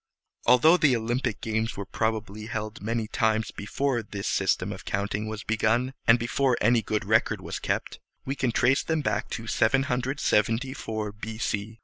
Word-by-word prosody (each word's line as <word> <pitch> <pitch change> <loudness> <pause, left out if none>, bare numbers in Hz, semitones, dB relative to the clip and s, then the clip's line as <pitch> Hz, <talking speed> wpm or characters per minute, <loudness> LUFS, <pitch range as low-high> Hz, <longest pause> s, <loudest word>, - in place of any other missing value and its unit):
Although 140 +8 +7
the 145 -7 +4
Olympic 120 0 -1
games 110 0 -2
were 100 - -4
probably 110 0 -2
held 110 -1 -5
many 115 +1 -2
times 110 0 0
before 120 +4 -1
this 100 -2 -6
system 95 0 +1
of 95 - -10
counting 100 +2 -2
was 110 0 -5
begun, 115 +4 +1
and 115 - +7
before 125 +2 +1
any 115 +2 +4
good 110 -1 -2
record - - +2
was - - -5
kept, - - -3 0.3
we 135 - -1
can 130 -3 0
trace 130 +4 +3
them 160 -1 -1
back - - -1
to 115 - -5
774 125 -2 0
B.C. 110 0 -4
115 Hz, 155 wpm, -27 LUFS, 110-125 Hz, 0.3 s, Although